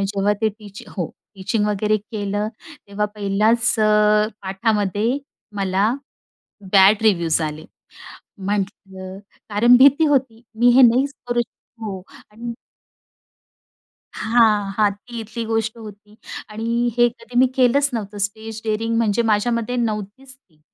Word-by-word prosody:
जेव्हा 200 +1 0
ते 220 - +4
टीच 205 -2 -11
हो, 175 -5 -1 0.3
टीचिंग 205 +2 -1
वगैरे 210 +1 +1
केलं. 205 0 -3 0.4
तेव्हा 210 +1 -1
पहिलाच 210 +3 +1 0.2
अ, 210 0 +3
पाठामध्ये 205 +4 0 0.4
मला 195 +3 +1 0.8
बॅड 200 +2 +6
रिव्यूज 170 -6 +2
आले. 155 0 -4 0.7
म्हटलं 195 -1 -5 0.3
कारण 235 +4 +5
भीती 280 +5 +6
होती. 260 -5 0 0.2
मी 245 +1 +5
हे 265 - +8
नाहीच 255 +4 +4 0.2
करू 240 0 +1
शक 235 0 -10
हो, 195 -4 -5 0.3
आणि 235 +2 -6 1.6
हां, 215 -3 +2
हां, 210 -2 +3
ती 240 -1 -7
इथली 230 +1 -6
गोष्ट 225 0 -2
होती 210 -1 -12 0.3
आणि 230 +3 -1
हे 240 - +6
कधी 235 0 -9
मी 260 - +5
केलंच 270 +3 +3
नव्हतं. 210 -2 -5
स्टेज 220 +2 -4
डेअरिंग 225 +1 -1
म्हणजे 225 -1 +1
माझ्यामध्ये 230 +2 0
नव्हतीच 230 +3 -4
ती. 170 - -33
215 Hz, 125 wpm, -21 LUFS, 205-235 Hz, 1.6 s, हे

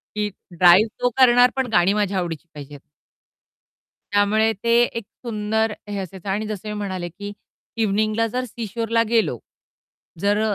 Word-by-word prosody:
की 210 0 -1 0.3
ड्राइव्ह 180 +5 +7
तो 245 - +3
करणार 245 -1 +6
पण 265 -2 0
गाणी 175 +2 +4
माझ्या 205 -2 0
आवडीची 170 -2 -4
पाहिजेत. 145 -1 -10 1.3
त्यामुळे 210 +2 +3
ते 235 - 0 0.3
एक 230 - -3 0.2
सुंदर 220 0 0 0.2
हे 205 -1 -4
असायचं 190 +1 -7
आणि 210 +3 -1
जसं 215 -1 -6
मी 210 - -3
म्हणाले, 185 -4 -4
की 205 +4 -8 0.5
इव्हनिंगला 215 +2 +1
जर 250 +3 -3
सी 230 0 -6
शोरला 230 +2 0
गेलो. 230 -2 +2 0.8
जर 205 +3 +1
210 Hz, 150 wpm, -22 LUFS, 190-225 Hz, 1.3 s, ड्राइव्ह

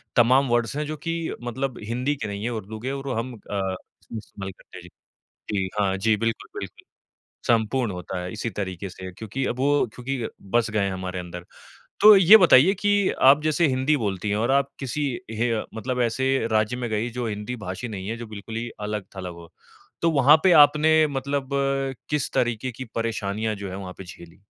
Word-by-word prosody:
तमाम 130 +3 +5
वर्ड्स 120 +2 +1
हैं 150 - -1
जो 155 +1 -4
कि 165 +1 -3
मतलब 130 +1 -3
हिंदी 125 +6 -1
के 110 - -5
नहीं 100 +1 -5
हैं, 120 - -1
उर्दू 110 -1 -6
के 130 +4 -3
और 140 0 -5
वो 130 - -1
हम 120 +3 -3
अ, - - -11
उसका 95 +3 -5
इस्तेमाल 100 -2 -8
करते 95 - -15
हैं - - -9
जी। 90 - -13 0.6
जी, 95 -2 0
हाँ 95 -2 +2
जी 110 +2 +2
बिल्कुल, 115 +1 -2
बिल्कुल, - - -9 0.6
सम्पूर्ण 115 0 +1
होता 90 0 -5
है 90 0 -5
इसी 115 +2 -3
तरीके 95 -1 -5
से 95 0 -9
क्योंकि 110 +7 -4
अब 125 - -3
वो 145 +1 +3
क्योंकि 125 -1 -3 0.2
बस 120 -1 +2
गए 105 - 0
हैं 100 - -1
हमारे 95 0 -4
अंदर। 90 0 -8 0.6
तो 210 +1 +10
ये 195 +3 +9
बताइए 180 -1 +6
कि 205 -1 +3 0.2
आप 145 +2 +4
जैसे 155 +2 +2
हिंदी 130 +3 +2
बोलती 105 -4 -2
हैं 105 - +1
और 115 +4 0
आप 140 0 +3
किसी 135 +2 -3 0.3
हे 115 +2 0
अ, 110 - -1
मतलब 125 +3 -3
ऐसे 130 +1 +1
राज्य 110 +3 +1
में 120 -2 -3
गई 110 +3 -1
जो 120 0 -4
हिंदी 105 +3 -4
भाषी 95 +7 -5
नहीं 100 -2 -6
है, 115 - -3
जो 120 -1 -7
बिल्कुल 110 +1 -8
ही 120 +1 -3
अलग-थलग 100 -3 -5
हो, 85 -1 -13 0.5
तो 165 - +4
वहाँ 145 0 +6
पे 185 - +6
आपने 155 +1 +3
मतलब 140 -1 -3 0.6
किस 150 -3 0
तरीके 120 +1 0
की 130 +3 -7
परेशानियाँ 110 -1 -2
जो 100 -1 -6
हैं 95 - -6
वहाँ 95 -2 -7
पे 95 - -8
झेली? 85 0 -13
115 Hz, 205 wpm, -24 LUFS, 100-135 Hz, 0.6 s, तो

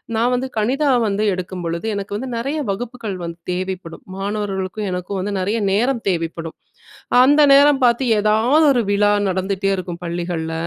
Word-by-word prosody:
நான் 235 +3 +2
வந்து 250 +1 -1
கணிதம் 255 +2 +2 0.3
எடுக்கும் 180 0 -5
பொழுது, 170 +4 -3
எனக்கு 200 0 -4
வந்து 260 +4 -5
நெறைய 275 +7 -2
வகுப்புக்கள் 225 0 -4
வந்து 170 0 -6
தேவைப்படும். 185 -2 -5
மாணவர்களுக்கும் 200 0 -3
எனக்கும் 180 +2 -4
வந்து 200 +2 -3
நெறைய 205 +5 -1
நேரம் 240 +4 +1
தேவைப்படும். 165 -2 -3 0.7
அந்த 290 +3 +5
நேரம் 280 0 +5
பாத்து 240 +2 +2
எதாவது 220 +9 +3
ஒரு 245 -2 +1
விழா 205 0 +3 0.2
நடந்துட்டே 190 +1 -1
இருக்கும் 180 -2 -6
பள்ளிகள்ல. 170 -1 -3
200 Hz, 145 wpm, -20 LUFS, 185-240 Hz, 0.7 s, அந்த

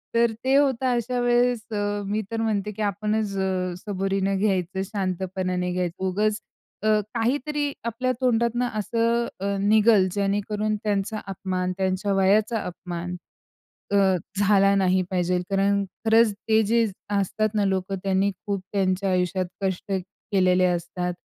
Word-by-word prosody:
तर 235 0 +4
ते 265 +1 +3
होतं, 270 -3 +3
अशा 245 +1 -1
वेळेस 245 -1 +2
अ, 205 0 -1
मी 210 +2 -1
तर 225 0 -1
म्हणते 210 -2 -1
की 215 - -7
आपणच 210 0 -1
अ, 185 -2 -1
सबुरीने 195 0 -1
घ्यायचं, 190 -2 0
शांतपणाने 185 -2 -2
घ्यायचं, 180 0 -3
उगचं 210 +3 +2 0.6
अ, 215 -1 +4
काहीतरी 285 +5 0
आपल्या 235 +2 -1
तोंडातनं 240 0 +2
असं 230 +2 +1
अ, 200 +1 -1
निघल 210 -1 +4
जेणेकरून 205 +1 0
त्यांचा 210 +1 -1
अपमान, 185 -1 -2
त्यांच्या 190 +1 0
वयाचा 205 +4 +3
अपमान 180 0 -5 0.8
अ, - - +2 0.4
झाला 200 -1 +4
नाही 185 -1 +3
पाहिजे 180 -1 +1
कारण 200 +1 +2 0.2
खरंच 225 0 +5
ते 220 +2 +1
जे 230 0 +4 0.3
असतात 215 +3 0
ना 205 - +2
लोकं, 190 0 -1
त्यांनी 195 +1 +2 0.2
खूप 200 -2 -1
त्यांच्या 190 0 +1
आयुष्यात 180 0 0 0.2
कष्ट 190 +1 -2
केलेले 185 -1 +1
असतात. 180 0 -1
200 Hz, 135 wpm, -24 LUFS, 185-220 Hz, 0.8 s, खरंच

